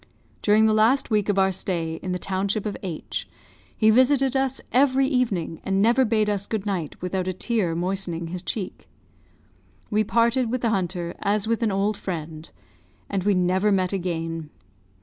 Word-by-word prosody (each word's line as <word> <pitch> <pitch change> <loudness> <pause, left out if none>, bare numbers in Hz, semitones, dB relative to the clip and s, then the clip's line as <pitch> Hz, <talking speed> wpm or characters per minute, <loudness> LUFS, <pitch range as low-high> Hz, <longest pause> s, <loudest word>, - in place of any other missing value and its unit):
During 215 +1 +4
the 220 - +4
last 230 +5 +3
week 210 -1 +1
of 200 - +1
our 190 0 +4
stay 170 -3 -2
in 185 - -4
the 180 - -1
township 195 +3 -2
of 210 - -2
H, 175 -5 -5 0.5
he 220 0 +5
visited 265 +2 +3
us 265 -1 0
every 270 +1 +4
evening, 225 - -1
and 195 0 0
never 235 +5 +4
bade 215 -2 +1
us 205 -1 -1
good 215 -3 -3
night 180 -7 -3
without 185 0 -2
a 185 - -1
tear 185 -4 -1
moistening 175 -2 -2
his 180 +1 -4
cheek. 190 0 -5 1.0
We 215 +1 +3
parted 235 +3 +2
with 255 +1 -2
the 230 - +1
hunter 175 -3 -2
as 205 +1 0
with 230 +1 0
an 225 -3 +1
old 200 +2 0
friend; 160 -3 -6 0.6
and 195 -2 -1
we 205 -1 +3
never 185 +3 +2
met 185 -1 +1
again. 165 -4 -3
200 Hz, 175 wpm, -24 LUFS, 180-225 Hz, 1.0 s, he